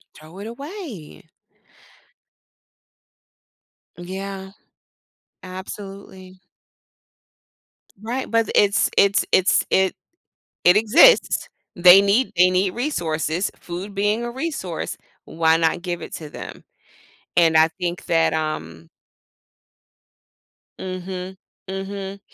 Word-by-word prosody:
Throw 160 +5 -14
it 205 - -7
away. 275 - -9 2.7
Yeah. 190 +2 -7 0.9
Absolutely. 190 0 -10 1.6
Right, 240 +4 -4
but 230 -1 +1
th - - -5
it's 200 -1 +3
it's 200 0 +4
it's 185 - +3
it 190 0 +2 0.7
it 180 +2 +6
exists. 250 - +5 0.3
They 180 +2 +8
need 200 +6 +2
they 180 +1 +5
need 185 +1 +1
resources, 175 - -2
food 185 +4 -7
being 205 +3 0
a 240 - -4
resource, 255 - -4 0.3
why 160 0 +2
not 165 +1 0
give 175 -2 -4
it - - -8
to 155 - -9
them? - - -9 0.7
And, 165 -2 +4
I 160 - +7
think 175 -1 -3
that, 165 -1 +2
um 80 - -4 1.9
Mhm. 185 0 -6 0.3
Mhm. 195 0 -6
190 Hz, 95 wpm, -22 LUFS, 175-205 Hz, 2.7 s, They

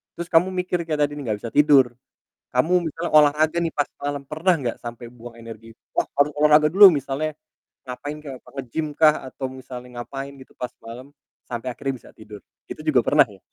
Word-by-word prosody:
Terus 170 0 -6
Kamu 175 +3 +4
mikir 180 -1 -2
kayak 155 -2 -3
tadi 145 - -9
nih 145 - -6
enggak 105 -3 -2
bisa 115 - -7
tidur, 140 -4 +5 0.6
kamu 170 +8 +2
misalnya 165 +4 -5
olahraga 150 +2 +4
nih 165 - -1
pas 145 - +1
malem, 145 0 -4
pernah 165 +5 +1
gak 125 -4 -3
sampe 120 0 -8
buang 120 -1 -12
energi, 115 0 -11 0.2
"Wah, - - +2 0.2
harus 145 +1 +4
olahraga 150 0 +5
dulu!" 200 +2 +10
misalnya 140 +3 -3 0.6
ngapain 145 +4 -6
kek, 135 -4 -8 0.2
nge-gym 135 +4 -4
kah 155 -1 +6 0.2
atau 130 - -5
misalnya 125 -1 -10
ngapain 135 +2 -7
gitu 130 - -16
pas 125 - -4
malem 120 +4 -10 0.4
sampai 120 +1 -5
akhirnya 135 +1 -4
bisa - - -15
tidur? 105 -1 -12 0.3
Itu - - -7
juga - - +4
pernah - - +5
ya? - - -16
140 Hz, 190 wpm, -23 LUFS, 125-155 Hz, 0.6 s, dulu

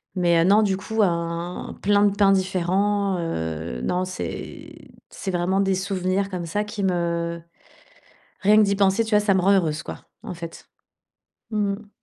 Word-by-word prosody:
Mais, 170 -2 +3
heu, - - +4
non, 205 +3 +5
du 195 -2 +1
coup, 220 +3 -2
hein, 170 0 -3
plein 205 +1 +4
de 200 - +2
pains 195 -1 +4
différents, 190 +1 0
heu. 80 - -4
Non, 180 +1 0
c'est 185 0 -7 0.2
c'est 190 - -5
vraiment 180 +2 +1
des 195 -1 +1
souvenirs 190 0 -1
comme 180 -3 -4
ça 205 +6 -1
qui 210 -1 -5
me 170 -2 -1 1.0
rien 210 +2 +5
que 215 - +7
d'y 200 -1 +1
penser, 200 +3 +3
tu 220 - -6
vois, 210 - +5
ça 205 -2 +2
me 190 - +3
rend 195 - +4
heureuse, 160 -6 +1
quoi, - - -9 0.2
en - - -6
fait. 170 -1 -9 0.8
Mmh 205 -2 0
mh. 210 +1 -10
190 Hz, 180 wpm, -23 LUFS, 170-200 Hz, 1.0 s, que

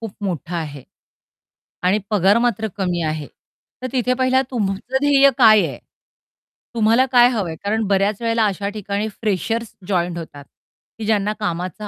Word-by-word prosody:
खूप 225 -3 -6
मोठं 175 -2 -4
आहे. 150 -5 -5 1.0
आणि 185 +4 +2
पगार 205 0 +3
मात्र 230 -2 0
कमी 180 -3 -1
आहे. 155 -2 -3 0.5
तर 255 - -3
तिथे 250 -1 +1
पहिला 260 +1 +2
तुमचं 220 +2 -2
ध्येय 280 -1 +5
काय 215 -2 +6
आहे? - - -8 1.0
तुम्हाला 230 +3 +3
काय 245 -1 +7
हवंय? 200 -10 -2
कारण 220 +2 0
बऱ्याच 200 +2 +1
वेळेला 230 -1 +1
अशा 200 0 -2
ठिकाणी 205 0 -3
फ्रेशर्स 220 +2 -3
जॉइंट 175 -3 -1
होतात, 150 -4 -9 0.6
की 220 - -4
ज्यांना 210 -1 +1
कामाचा 185 0 -4
210 Hz, 145 wpm, -20 LUFS, 185-230 Hz, 1.0 s, काय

